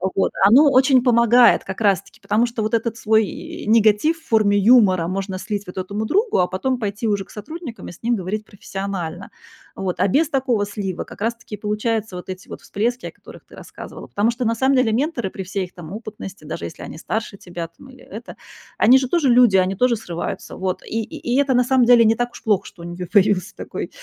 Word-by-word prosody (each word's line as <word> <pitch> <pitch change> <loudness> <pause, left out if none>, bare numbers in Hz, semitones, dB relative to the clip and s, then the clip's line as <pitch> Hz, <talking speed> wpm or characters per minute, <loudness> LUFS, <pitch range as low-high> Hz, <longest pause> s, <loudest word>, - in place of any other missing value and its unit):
вот, 195 - +1 0.2
оно 280 +5 +6
очень 260 -1 +4
помогает 235 -1 +5
как 190 +3 -7
раз-таки, 200 -5 0
потому 215 +3 +1
что 235 -1 -4
вот 215 - -3
этот 230 0 0
свой 220 -2 -1
негатив 220 +8 +3
в 320 - -25
форме 215 -3 +3
юмора 200 -5 +5
можно 190 +1 -3
слить 205 0 -4
вот 180 - -10
этому 200 +4 -3
другу, 420 - +1
а 180 - +3
потом 250 +8 -2
пойти 210 +1 -3
уже 205 -2 0
к - - -29
сотрудникам 275 - -8
и - - -7
с 175 - -17
ним 240 +1 +1
говорить 205 +3 -4
профессионально. 195 -3 -6 0.5
Вот, 190 -2 -4
а - - +3
без 295 - +2
такого 255 -7 0
слива 200 -3 -4
как - - -14
раз 230 +2 0
таки 225 -2 -9
и - - -14
получаются 210 0 -2
вот 180 +1 -8
эти 185 +1 -7
вот - - -9
всплески, 240 +5 -2
о - - -8
которых - - -15
ты - - -16
рассказывала. - - -10
Потому 215 +4 +1
что 245 +1 -4
на 230 0 +1
самом 265 +3 +2
деле 255 -3 +3
менторы 240 - -1
при 190 - -7
всей 195 +1 -3
их 180 - -16
там 175 +1 -10
опытности, 210 -6 -9
даже 145 - -5
если 85 - -9
они - - -9
старше 215 +3 -4
тебя 175 -2 -7
там 170 +11 -17
или 260 -1 -16 0.2
это, 245 - -12 0.4
они 250 +4 +7
же 260 -1 -1
тоже 305 -1 +1
люди, 240 -5 +5
они 185 +1 +1
тоже 250 +4 +2
срываются, 175 -6 -6
вот, 185 -1 -3
и 225 - -3
и - - -9
и 255 - +2
это 280 -2 +2
на 250 0 +4
самом 255 0 +3
деле 235 -1 +6
не 225 - +4
так 245 +1 -2
уж - - -11
плохо, 205 -3 +2
что 170 - -13
у - - -8
них 175 0 -7
появился 200 -1 +2
такой, - - -6
215 Hz, 230 wpm, -21 LUFS, 195-245 Hz, 0.5 s, они